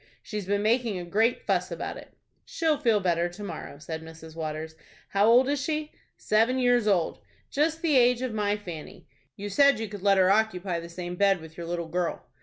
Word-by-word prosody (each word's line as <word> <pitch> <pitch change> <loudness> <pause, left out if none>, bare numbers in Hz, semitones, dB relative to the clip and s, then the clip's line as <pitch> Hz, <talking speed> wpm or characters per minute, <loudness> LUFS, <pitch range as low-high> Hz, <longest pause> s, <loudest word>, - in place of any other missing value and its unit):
She's 210 -4 -5
been 205 +1 0
making 230 -2 +1
a 175 - -5
great 220 +7 +1
fuss - - 0
about - - -5
it." - - -13 0.3
"She'll 325 - 0
feel 230 -7 +3
better 175 -2 +1
to 185 +4 -10
morrow," 165 -6 -7
said 160 +2 -6
Mrs. 160 0 -12
Waters. 160 0 -4 0.4
"How 200 +2 +3
old 245 +3 +6
is 285 0 0
she?" 305 +1 -2 0.3
"Seven 225 +4 +2
years 245 -3 +3
old." 185 -5 +1 0.3
"Just 315 +3 0
the 305 -5 +4
age 250 0 +4
of 255 -3 -2
my 210 -1 0
Fanny." 175 -7 -9 0.3
"You 205 - -6
said 280 +8 +4
you 225 - -3
could 205 -1 -8
let 200 0 +4
her 185 0 +5
occupy 195 -4 +1
the 170 0 -9
same 175 +1 -6
bed 195 0 +3
with 160 0 -12
your 170 -1 -7
little 170 -1 -3
girl." 175 +1 -2
205 Hz, 210 wpm, -27 LUFS, 175-245 Hz, 0.4 s, old